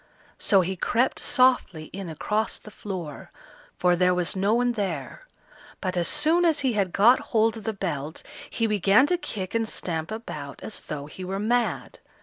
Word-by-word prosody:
So 195 -2 +4
he 185 +2 -2
crept 240 +7 +1
softly 250 -11 +2
in 190 -2 -6
across 210 +7 -1
the 215 - -13
floor, 180 -9 -7 0.5
for 180 -1 +3
there 180 +1 +3
was 180 +3 -1
no 200 +4 +2
one 245 0 +2
there; 200 - -4 0.5
but 185 -2 -3
as 175 -1 +1
soon 315 +3 +3
as 325 -4 +3
he 260 -3 +1
had 200 -4 0
got 230 +8 +5
hold 225 0 +1
of 215 - -10
the 220 - 0
belt, 160 -6 -4 0.3
he 230 - -1
began 210 +3 +4
to 355 +4 +2
kick 190 - -5
and 225 -1 0
stamp 160 -2 -3
about 150 -11 -7
as 220 - -5
though 145 -2 -6
he 170 +5 -9
were 190 +1 -3
mad. 235 +4 -1
200 Hz, 180 wpm, -25 LUFS, 180-230 Hz, 0.5 s, got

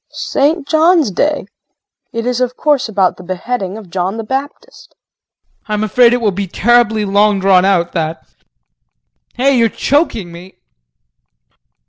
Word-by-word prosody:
KRISTIN. - - -4 0.2
St. - - -38
John's 320 - +3
Day! 295 +10 -1 0.7
It 230 0 -4
is 250 0 -1
of 250 0 -2
course 285 -5 +1
about 195 -4 +1
the 185 - -12
beheading 190 +2 -4
of 200 -6 -12
John 190 +3 -2
the 225 - -4
Baptist. 285 - -7
JEAN. - - -51
I'm 210 0 -2
afraid 235 +3 +4
it 245 - +2
will 215 -3 +1
be 195 +1 -4
terribly 220 +2 +2
long 205 +1 +2
drawn 190 -1 +4
out 175 -3 +1
that. 160 -1 -4 1.1
Hey, 270 +2 +2
you're 230 -2 +3
choking 230 - -1
me. 175 +3 -13
215 Hz, 150 wpm, -15 LUFS, 190-250 Hz, 1.1 s, afraid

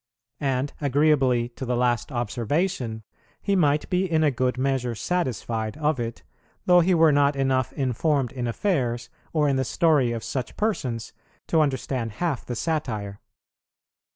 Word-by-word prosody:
And, 135 -1 -1
agreeably 135 -4 +3
to 120 - -9
the 125 -1 -1
last 120 +1 0
observation, 120 - -1 0.4
he 200 - 0
might 150 -4 +2
be 180 0 +1
in 160 -1 +3
a 150 - +4
good 125 0 0
measure 130 -2 0
satisfied 115 - -2
of 150 -2 0
it, 115 -1 -4 0.4
though 180 -1 +6
he 175 +1 +3
were 165 -1 +5
not 145 0 +3
enough 130 -2 +1
informed 135 0 0
in 125 -2 -3
affairs, 120 - -1 0.2
or 150 -2 +2
in 135 -1 +2
the 130 - +1
story 140 -1 +2
of 115 -1 -4
such 130 -4 -4
persons, 130 - -2 0.4
to 160 - +4
understand 130 -5 -1
half 160 +1 -2
the 120 - -3
satire. 110 -9 -2
130 Hz, 155 wpm, -25 LUFS, 120-155 Hz, 0.4 s, though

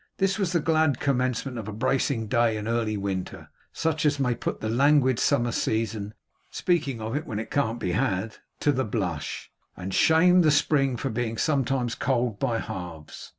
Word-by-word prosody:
This 195 +2 +1
was 190 -4 0
the 175 - +2
glad 155 -4 +2
commencement 130 -2 -1
of 110 - -7
a - - -4
bracing 125 +1 0
day 115 0 +2
in 105 0 -5
early 115 -2 0
winter, 95 -2 -4 0.2
such 160 -1 -1
as 145 -2 +2
may 125 -3 +2
put 120 - -4
the 110 - -3
languid 130 +1 +3
summer 120 -4 +2
season 110 -2 -2 0.3
(speaking 145 -9 0
of 110 +3 -4
it 150 - -3
when 110 - -4
it 110 - -5
can't 120 -4 0
be 90 - -2
had) 110 -1 -1 0.2
to 145 - +3
the 130 -1 0
blush, 95 - -4 0.3
and 95 +1 -5
shame 180 - +5
the 160 - +4
spring 145 -3 +2
for 135 - -3
being 115 0 -2
sometimes 135 -4 0
cold 120 -3 -1
by 120 -4 0
halves. 85 -7 -7
120 Hz, 185 wpm, -26 LUFS, 110-145 Hz, 0.3 s, shame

